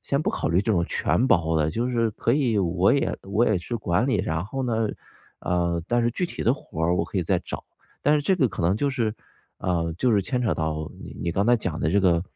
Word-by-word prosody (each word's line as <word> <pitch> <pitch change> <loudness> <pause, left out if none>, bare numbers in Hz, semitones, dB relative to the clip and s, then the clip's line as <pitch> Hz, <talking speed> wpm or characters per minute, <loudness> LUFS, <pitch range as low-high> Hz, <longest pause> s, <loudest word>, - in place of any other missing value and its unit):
先 140 - 0
不 - - 0
考 - - -2
虑 85 +3 +3
这 115 - -1
种 85 -3 +2
全 125 - +1
包 80 -4 +3
的， 75 0 +1
就 120 +9 -1
是 115 -2 +1
可 115 - 0
以， 125 -6 +2
我 90 0 +2
也 140 - +1
我 105 +4 +2
也 105 -4 +2
去 90 +8 -6
管 100 +2 0
理。 130 - +2
然 80 +2 -1
后 135 +6 -4
呢 115 -3 0 0.5
呃， 85 -1 0
但 120 0 +2
是 120 - +2
具 180 - -1
体 - - -6
的 120 - +4
活 80 - -7
儿， 85 - +2
我 85 - +1
可 95 - -3
以 - - +1
再 90 +1 +2
找。 - - -7 0.4
但 150 - +4
是 150 - +1
这 190 +4 +2
个 130 -8 +3
可 85 - -5
能， 90 +4 +2
就 140 +6 0
是 115 -5 -1 0.5
呃， 85 -2 -1
就 125 -3 +2
是 100 - +4
牵 125 +5 -1
扯 100 -9 +1
到 80 0 -3
你 - - -9
你 85 - -1
刚 100 +4 +1
才 120 - +6
讲 95 -7 -3
的 80 - +1
这 100 - +3
个， 85 -3 +3
100 Hz, 280 characters per minute, -25 LUFS, 85-120 Hz, 0.5 s, 才